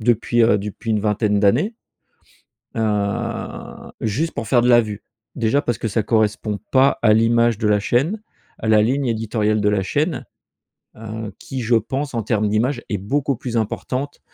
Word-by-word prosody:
depuis, 120 +1 +2
heu, 115 -2 +4
depuis 105 +3 -5
une 105 -1 +2
vingtaine 105 0 +1
d'années. 130 - +2 1.0
Heu, 105 -3 -3
juste 140 +10 -1
pour 110 - -4
faire 120 -1 +4
de 125 - +2
la 120 -1 +7
vue. 105 -2 -6 0.3
Déjà 120 +4 +1
parce 120 -5 -2
que 115 - -2
ça 110 +2 0
correspond 110 -1 0
pas 135 +1 +4
à 110 -2 +5
l'image 115 0 +3
de 110 - -1
la 105 -1 +3
chaîne, 155 - 0 0.4
à 110 - -4
la 110 -1 +5
ligne 135 +4 +1
éditoriale 110 -1 0
de 105 - +2
la 105 -2 +1
chaîne, 95 - -1 0.7
heu, 110 -1 -7
qui 130 -2 -5
je 115 +1 +2
pense 135 +5 -2
en 115 - -1
termes 110 -1 0
d'image 120 +5 0
est 105 - -1
beaucoup 135 +8 -1
plus 120 -1 -5
importante 130 +5 -3
115 Hz, 175 wpm, -21 LUFS, 105-120 Hz, 1.0 s, la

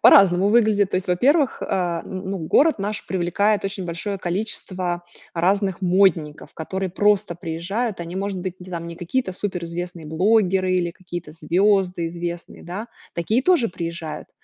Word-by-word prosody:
по-разному 190 0 +7
выглядит. 210 -3 +4
То - - +1
есть, 185 - -2
во-первых, 270 - +3
э, - - -3
н 175 -3 0 0.3
ну, 195 - -2
город 280 - +3
наш 205 +1 -3
привлекает 195 +4 +1
очень 195 -1 -3
большое 180 +4 -3
количество 180 -1 -2 0.3
разных 190 +2 +1
модников, 175 -5 +2
которые 190 +3 -3
просто 205 0 +2
приезжают. 175 +7 -3
Они, 170 +1 -5
может 195 0 -2
быть, 185 0 -5
не 185 - -10 0.2
не 170 - -6
какие-то 185 +5 -1
суперизвестные 175 -3 -4
блогеры 185 +2 +2
или 180 -2 +1
какие-то 175 -2 -8
звёзды 185 +1 +2
известные, 170 0 -6
да. 190 +6 -5 0.3
Такие 215 +9 +1
тоже 335 -9 +4
приезжают, 170 -2 -5
185 Hz, 145 wpm, -23 LUFS, 170-200 Hz, 0.3 s, по-разному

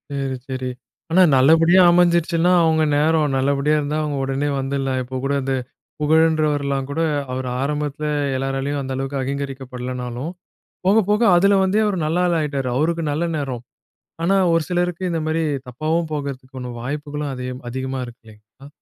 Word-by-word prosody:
சரி, 135 -1 -2
சரி. 130 -1 -3 0.4
ஆனா 185 +3 +5 0.2
நல்லபடியா 165 +7 +5
அமைஞ்சிருச்சுனா, 170 0 +3
அவங்க 160 -1 +3
நேரம். 155 -1 +2
நல்லபடியா 140 +2 +1
இருந்தா 150 +1 -2
அவங்க 145 -2 -2
உடனே 135 +2 -1
வந்துர்லாம். 135 -1 -1
இப்போ 130 +1 -6
கூட 140 +1 0
இந்த 135 0 -1 0.5
புகழன்றவர்லாம் 150 -3 +2
கூட, 160 +3 -1 0.3
அவர் 130 0 -3
ஆரம்பத்தில 150 +1 -2 0.3
எல்லோராலயும் 135 +2 -2
அந்த 130 -1 -4
அளவுக்கு 135 +1 -3
அகிங்கரிக்கப்படலனாலும் 130 0 -5 0.6
போக 205 +3 +5
போக 210 +2 +2
அதில 200 +3 +4
வந்தே 190 +3 +2
அவர் 205 - 0
நல்ல 165 +3 0
ஆளாயிட்டாரு, 150 -6 -1
அவருக்கு 165 +3 0
நல்ல 155 +4 -1
நேரம். 130 -5 -4 0.6
ஆனா 195 +4 +3 0.2
ஒரு 165 - +3
சிலருக்கு 180 0 -1
இந்த 165 - -1
மாரி 160 +1 0 0.2
தப்பாவும் 155 +5 -1
போகறதுக்கான 130 -3 -5
வாய்ப்புகளும் 145 +2 -4
அதே 125 0 -5 0.2
அதிகமா 130 +1 -4
இருக்கு. 120 0 -14
இல்லங்களா? 110 +6 -17
145 Hz, 145 wpm, -21 LUFS, 135-160 Hz, 0.6 s, ஆனா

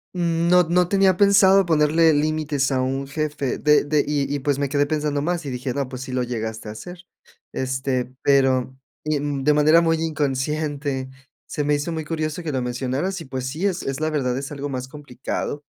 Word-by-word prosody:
n 170 -1 0
no 180 0 +6
no 175 +1 +2
tenía 195 -1 +3
pensado 195 -1 +5
ponerle 160 0 +4
límites 150 -2 0
a 130 -1 +1
un 135 +1 -2
jefe 145 -2 -2
de 150 0 +4
de 150 0 +1
y 145 -1 -1
y, 145 - -1
pues, 140 0 0
me 140 -1 -1
quedé 145 +1 +2
pensando 150 -1 -1
más 170 +1 -2
y - - -3
dije: 125 0 -3
"No, 140 -1 -2
pues, 130 -1 -7
sí 130 - -7
lo 125 0 0
llegaste 110 -2 -4
a - - -5
hacer", 175 +10 -10 0.5
este, 130 -1 -2
pero 130 -2 +2 0.3
y, 155 -1 0
mm, 145 -1 -3
de 150 +2 +4
manera 155 +3 +5
muy 165 -1 +2
inconsciente, 145 -2 -2 0.4
se 150 - -3
me 150 +1 +1
hizo 145 +4 -3
muy 160 -1 -3
curioso 155 +1 -3
que 160 - -3
lo 130 - 0
mencionaras 130 +9 -2
y, - - -8
pues, 130 -1 -4
sí, 155 +8 -3
es 185 -3 -1
es 135 0 -3
la 155 0 0
verdad, 130 -5 -1
es 135 +1 -5
algo 145 0 -5
más 130 -1 -4
complicado. 145 +1 -5
145 Hz, 210 wpm, -22 LUFS, 130-160 Hz, 0.5 s, no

